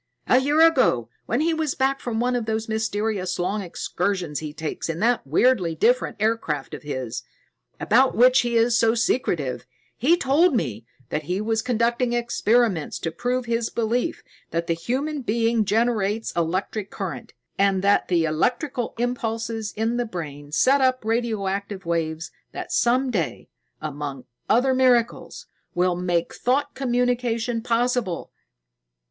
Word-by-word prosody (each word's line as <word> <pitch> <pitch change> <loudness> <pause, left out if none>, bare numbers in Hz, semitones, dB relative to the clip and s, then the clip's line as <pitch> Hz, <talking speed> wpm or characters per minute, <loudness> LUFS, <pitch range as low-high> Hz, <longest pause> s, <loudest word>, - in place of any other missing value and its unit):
"A 255 - +5
year 290 +4 +2
ago, 195 - +3 0.2
when 240 +5 +1
he 330 +1 +2
was 315 -3 -1
back 270 +1 +1
from 230 -2 -3
one 250 +1 +1
of 235 -2 -2
those 220 0 -1
mysterious 215 -4 -1
long 190 +4 -1
excursions 180 -2 -2
he 155 -1 -5
takes 155 +2 -5
in 165 0 -3
that 235 - +1
weirdly 175 - +2
different 245 +9 +2
aircraft 210 -10 -1
of - - -6
his, 130 -6 -4 0.6
about 255 +5 +3
which 255 +2 +6
he 240 -1 +1
is 230 +1 +3
so 225 0 +3
secretive, 170 - -1 0.3
he 320 +9 +3
told 300 +2 +3
me 115 - -2 0.2
that 150 - -3
he 180 +4 -1
was 220 +1 0
conducting 240 0 0
experiments 235 -6 +1
to 165 - -3
prove 250 +7 -2
his 230 -1 -1
belief 235 +7 -1 0.3
that 170 0 -2
the 165 - +1
human 270 - -2
brain 230 -1 +1
generates 220 0 +1
electric 185 +5 -2
current, - - -6 0.3
and 195 -1 +2
that 200 0 +3
the 170 -3 +2
electrical 245 - -1
impulses 230 -2 -2
in 225 +2 0
the 245 - 0
brain 145 -6 -7
set 270 - +4
up 255 -3 +2
radioactive 200 -4 -2
waves 165 -1 -2 0.2
that - - -6
some 255 +2 +2
day, 180 -8 -3 0.3
among 145 -3 -5 0.2
other 255 +4 +4
miracles, 250 -2 +1 0.3
will 180 0 +2
make 175 -1 -1
thought 280 +4 0
communication 245 -2 0
possible. 235 -5 -1
225 Hz, 145 wpm, -24 LUFS, 175-245 Hz, 0.6 s, which